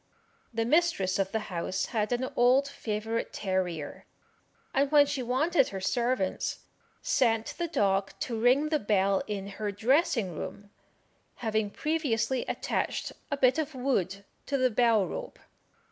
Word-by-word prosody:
The 230 -1 -1
mistress 245 - +2
of 195 0 0
the - - 0 0.2
house 175 +2 -1
had 215 -1 0
an 245 +1 0
old 255 +3 +4
favourite 225 -3 -3
terrier, 180 -6 -3 0.7
and 275 +1 +2
when 295 -1 +7
she 285 -2 -3
wanted 270 +4 +2
her 195 - -5
servants, 235 0 -1 0.4
sent 235 - +1
the 345 - 0
dog 195 - +1
to 240 - -2
ring 265 +6 +4
the 305 -1 +1
bell 200 -3 +2
in 200 -2 -3 0.2
her 210 -1 0
dressing 225 - +1
room, 205 +6 -7 0.7
having 220 -1 +1
previously 260 -3 -1
attached - - -2 0.2
a 285 - -1
bit 265 +2 +4
of 310 -2 -3
wood 200 -7 -1 0.2
to 280 - 0
the 255 -1 +2
bell 225 -3 +3
rope. - - -6
230 Hz, 145 wpm, -29 LUFS, 200-275 Hz, 0.7 s, when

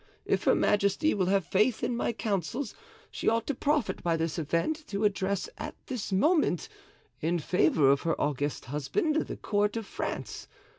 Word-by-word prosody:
If - - 0
her - - +5
majesty 205 +10 +2
will 185 -3 0
have 195 -1 +2
faith 215 +5 +2
in 245 - 0
my 235 - 0
counsels 220 - -2 0.4
she - - 0
ought 230 0 +1
to 285 - -1
profit 295 +3 0
by 170 -1 +1
this 165 0 -2
event 170 - -1
to 200 +1 -2
address 200 -2 0
at - - -5
this 250 -7 -4
moment, 290 - +2 0.5
in 170 +3 0
favor 155 -4 +3
of 140 - +2
her 165 - -1
august 145 -1 -1
husband, 150 - -1
the - - -5
court 205 +1 0
of 225 - -4
France. - - -5
200 Hz, 170 wpm, -29 LUFS, 165-235 Hz, 0.5 s, her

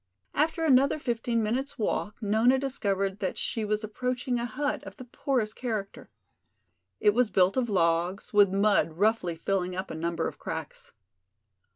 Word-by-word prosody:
After 320 +3 +1
another 275 0 +4
fifteen 235 -4 -1
minutes' 260 +7 -2
walk 215 -2 -1
Nona 220 +5 +4
discovered 200 -7 -1
that 190 - -2
she 225 - -2
was 210 +1 -1
approaching 250 +3 -2
a 240 - -2
hut 285 +5 -2
of - - -10
the 255 - -8
poorest 240 -3 -1
character. 215 -6 -4 0.9
It 210 -1 +4
was 245 0 +2
built 185 -1 +3
of 250 -3 0
logs, 175 +1 0
with 205 -1 +6
mud 200 -3 +2
roughly 195 -1 +1
filling 180 +1 -1
up 185 +1 -4
a - - -4
number 165 +1 -1
of - - -8
cracks. 160 -2 -7
215 Hz, 160 wpm, -28 LUFS, 190-250 Hz, 0.9 s, with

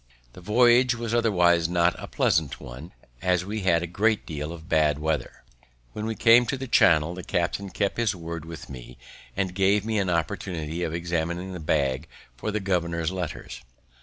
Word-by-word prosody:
The - - -12
voyage 120 +5 +4
was 115 -1 -4
otherwise 90 -8 +3
not 85 0 +3
a - - -7
pleasant 80 -5 0
one, 65 +8 -10 0.3
as 90 -1 +1
we 105 +2 -4
had 85 -3 +2
a - - -1
great 105 +5 0
deal 75 -1 -5
of 80 -1 -10
bad 75 -4 +2
weather. 80 0 -3 0.5
When 105 +1 -4
we 110 - -2
came 115 +2 +6
into 130 +3 -2
the 135 0 -6
Channel, 85 -7 +4
the 90 0 -8
captain 90 +4 -2
kept 100 +1 -1
his 115 -4 +1
word 85 -2 -6
with 80 -2 -9
me, 60 -1 -10 0.4
and 95 -2 -1
gave 100 +2 +2
me 110 -1 0
an 95 -2 0
opportunity 85 -1 -2
of 80 -2 -2
examining 85 +2 -3
the 90 - -6
bag 70 -1 0 0.3
for - - -4
the 105 0 -1
governor's 85 -4 -1
letters. 85 -9 -6
90 Hz, 185 wpm, -25 LUFS, 80-100 Hz, 0.5 s, came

